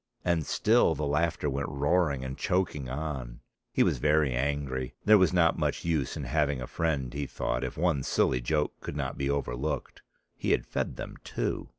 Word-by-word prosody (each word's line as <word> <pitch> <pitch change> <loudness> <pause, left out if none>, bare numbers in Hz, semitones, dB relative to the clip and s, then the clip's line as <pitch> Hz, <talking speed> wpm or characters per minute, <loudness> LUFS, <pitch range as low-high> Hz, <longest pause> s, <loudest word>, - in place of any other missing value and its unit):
And 85 -4 +1
still 110 -7 +3
the 75 +1 -2
laughter 75 +2 0
went 70 -1 -2
roaring 70 0 +1
and 65 +1 -4
choking 80 -8 -1
on. 65 -4 -4 0.3
He - - +3
was - - +1
very 75 -3 +3
angry. 65 -1 -2
There 105 0 +7
was 95 -3 +4
not 85 -2 +3
much - - -1
use 80 -5 0
in 75 - -4
having 70 +1 +1
a 65 - -4
friend, 70 -4 -1
he 70 -1 -3
thought, 65 +1 -2
if 65 - -4
one 70 - +2
silly 65 -1 +1
joke 75 +4 0
could - - -6
not 70 -3 -2
be 70 0 -2
overlooked; 70 0 -2 0.3
he - - +1
had - - 0
fed - - -2
them - - -7
too. - - -3
70 Hz, 190 wpm, -29 LUFS, 65-80 Hz, 0.3 s, There